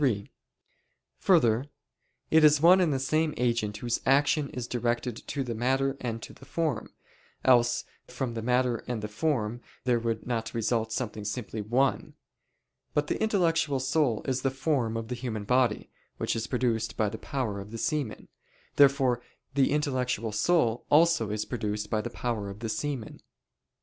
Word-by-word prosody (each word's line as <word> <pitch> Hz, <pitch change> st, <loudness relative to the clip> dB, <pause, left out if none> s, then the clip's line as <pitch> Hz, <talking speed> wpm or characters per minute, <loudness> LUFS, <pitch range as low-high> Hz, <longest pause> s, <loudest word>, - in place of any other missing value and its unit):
3: 110 Hz, -8 st, 0 dB, 0.9 s
Further, 125 Hz, -, +3 dB, 0.7 s
it 160 Hz, 0 st, +6 dB
is 150 Hz, -1 st, +7 dB
one 180 Hz, +4 st, +7 dB
and 170 Hz, -4 st, +2 dB
the 135 Hz, -, +1 dB
same 155 Hz, +4 st, 0 dB
agent 115 Hz, -4 st, 0 dB
whose 120 Hz, +2 st, -2 dB
action 140 Hz, +1 st, +3 dB
is 125 Hz, -2 st, -5 dB
directed 120 Hz, 0 st, -1 dB
to 140 Hz, -, -2 dB
the 120 Hz, -2 st, -4 dB
matter 135 Hz, +4 st, +1 dB
and 115 Hz, -2 st, -4 dB
to -, -, -9 dB
the -, -, -17 dB
form: 145 Hz, -4 st, -2 dB, 0.5 s
else 120 Hz, -2 st, +4 dB, 0.2 s
from 125 Hz, -1 st, -4 dB
the 115 Hz, -, -4 dB
matter 125 Hz, 0 st, +2 dB
and 115 Hz, -4 st, -3 dB
the -, -, -2 dB
form 120 Hz, -1 st, -1 dB, 0.2 s
there 125 Hz, -2 st, +2 dB
would 115 Hz, -1 st, -2 dB
not 115 Hz, -2 st, -3 dB
result 115 Hz, 0 st, 0 dB
something 110 Hz, -2 st, -3 dB
simply 105 Hz, 0 st, -4 dB
one. 125 Hz, +6 st, 0 dB, 0.8 s
But 150 Hz, -, +2 dB
the -, -, -1 dB
intellectual 165 Hz, -9 st, +2 dB
soul 130 Hz, -3 st, +1 dB
is 130 Hz, -1 st, -1 dB
the 135 Hz, -, +1 dB
form 130 Hz, -4 st, 0 dB
of 115 Hz, 0 st, -4 dB
the 125 Hz, -, -4 dB
human 120 Hz, -4 st, -4 dB
body, 125 Hz, 0 st, +1 dB, 0.3 s
which -, -, -1 dB
is 115 Hz, -, -2 dB
produced 120 Hz, -3 st, -1 dB
by 110 Hz, -, +2 dB
the 110 Hz, +2 st, -5 dB
power 115 Hz, -8 st, -3 dB
of 100 Hz, +1 st, -8 dB
the 115 Hz, -, -6 dB
semen. 145 Hz, -4 st, -2 dB, 0.5 s
Therefore 135 Hz, -3 st, +4 dB, 0.3 s
the 135 Hz, -1 st, +3 dB
intellectual 130 Hz, -6 st, 0 dB
soul 120 Hz, +1 st, +2 dB
also 155 Hz, -7 st, +4 dB
is 105 Hz, 0 st, -2 dB
produced 105 Hz, -3 st, -3 dB
by 110 Hz, -, +1 dB
the 120 Hz, -, -5 dB
power 115 Hz, -4 st, -3 dB
of 100 Hz, +2 st, -9 dB
the 115 Hz, -, -3 dB
semen. 120 Hz, +1 st, -4 dB
125 Hz, 170 wpm, -28 LUFS, 110-140 Hz, 0.9 s, is